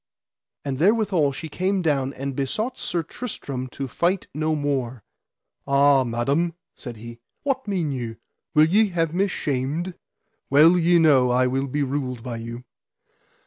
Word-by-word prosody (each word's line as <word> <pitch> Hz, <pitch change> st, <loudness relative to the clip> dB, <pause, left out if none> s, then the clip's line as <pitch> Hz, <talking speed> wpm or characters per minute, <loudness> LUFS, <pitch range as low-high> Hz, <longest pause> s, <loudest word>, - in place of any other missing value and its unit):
And 135 Hz, -2 st, -3 dB
therewithal 190 Hz, -5 st, +3 dB
she 160 Hz, +4 st, -6 dB
came 185 Hz, +4 st, -1 dB
down 135 Hz, -4 st, +1 dB
and 135 Hz, 0 st, -5 dB
besought 215 Hz, -, -2 dB
Sir 170 Hz, -8 st, -2 dB
Tristram 140 Hz, -, -5 dB
to 135 Hz, +2 st, -6 dB
fight 175 Hz, +8 st, 0 dB
no 155 Hz, +2 st, 0 dB
more. 130 Hz, -6 st, -2 dB, 0.6 s
Ah, 140 Hz, -1 st, +5 dB
madam, 140 Hz, +8 st, 0 dB, 0.2 s
said 120 Hz, -4 st, -9 dB
he, 115 Hz, +2 st, -10 dB, 0.2 s
what 270 Hz, -4 st, -1 dB
mean 180 Hz, -7 st, -1 dB
you, 120 Hz, -4 st, -4 dB, 0.4 s
will 155 Hz, 0 st, +7 dB
ye 210 Hz, +7 st, +4 dB
have 165 Hz, -3 st, -1 dB
me 195 Hz, +3 st, +2 dB
shamed? 150 Hz, +2 st, -2 dB, 0.6 s
Well 155 Hz, +5 st, +6 dB
ye 175 Hz, 0 st, +4 dB
know 140 Hz, -6 st, +5 dB
I 125 Hz, +1 st, +3 dB
will 135 Hz, +2 st, 0 dB
be 145 Hz, +2 st, -1 dB
ruled 130 Hz, -3 st, -3 dB
by 120 Hz, -3 st, -5 dB
you. 115 Hz, +2 st, -7 dB
145 Hz, 150 wpm, -23 LUFS, 130-175 Hz, 0.6 s, will